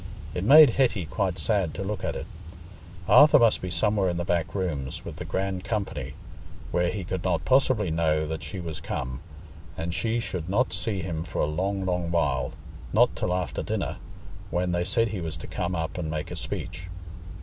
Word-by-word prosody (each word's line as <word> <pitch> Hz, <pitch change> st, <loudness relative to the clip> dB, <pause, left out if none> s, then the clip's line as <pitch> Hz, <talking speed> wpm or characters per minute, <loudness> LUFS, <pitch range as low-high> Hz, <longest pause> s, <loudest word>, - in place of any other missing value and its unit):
It 90 Hz, -, -2 dB
made 145 Hz, +4 st, +9 dB
Hetty 115 Hz, -9 st, +1 dB
quite 90 Hz, +4 st, -1 dB
sad 100 Hz, -7 st, 0 dB
to 95 Hz, -, -3 dB
look 105 Hz, +2 st, -4 dB
at -, -, -1 dB
it: -, -, -5 dB, 0.8 s
Arthur 150 Hz, +1 st, +8 dB
must 115 Hz, -4 st, +4 dB
be 90 Hz, -, -4 dB
somewhere 95 Hz, +2 st, +2 dB
in 85 Hz, -, -2 dB
the 85 Hz, -, -2 dB
back 85 Hz, +1 st, -1 dB
rooms, 75 Hz, -9 st, -3 dB
with -, -, -7 dB
the -, -, -6 dB
grand 95 Hz, -1 st, -2 dB
company, 100 Hz, -, -3 dB, 0.6 s
where 90 Hz, 0 st, +2 dB
he 100 Hz, -1 st, -3 dB
could 90 Hz, +1 st, -4 dB
not 90 Hz, -3 st, 0 dB
possibly 130 Hz, -8 st, +3 dB
know 80 Hz, -1 st, +1 dB
that 80 Hz, +1 st, -4 dB
she 80 Hz, +4 st, -6 dB
was 80 Hz, -3 st, -5 dB
come, 65 Hz, -4 st, -4 dB, 0.6 s
and 85 Hz, +1 st, -3 dB
she 110 Hz, +6 st, 0 dB
should 90 Hz, -7 st, -4 dB
not 120 Hz, +7 st, +1 dB
see 100 Hz, -6 st, -2 dB
him 80 Hz, -3 st, -3 dB
for 85 Hz, -, -5 dB
a -, -, +3 dB
long, 95 Hz, +6 st, -1 dB
long 90 Hz, -2 st, -1 dB
while—not 75 Hz, -2 st, 0 dB
till 90 Hz, -, -1 dB
after 90 Hz, -6 st, -1 dB
dinner, -, -, -2 dB, 0.5 s
when 90 Hz, 0 st, 0 dB
they 85 Hz, 0 st, 0 dB
said 115 Hz, +4 st, +2 dB
he 100 Hz, -3 st, -4 dB
was 80 Hz, -2 st, -4 dB
to 80 Hz, -, -8 dB
come 90 Hz, 0 st, -3 dB
up 80 Hz, +1 st, -3 dB
and 80 Hz, -3 st, -3 dB
make 80 Hz, -1 st, -4 dB
a -, -, -4 dB
speech. 90 Hz, 0 st, -5 dB
90 Hz, 195 wpm, -26 LUFS, 80-100 Hz, 0.8 s, made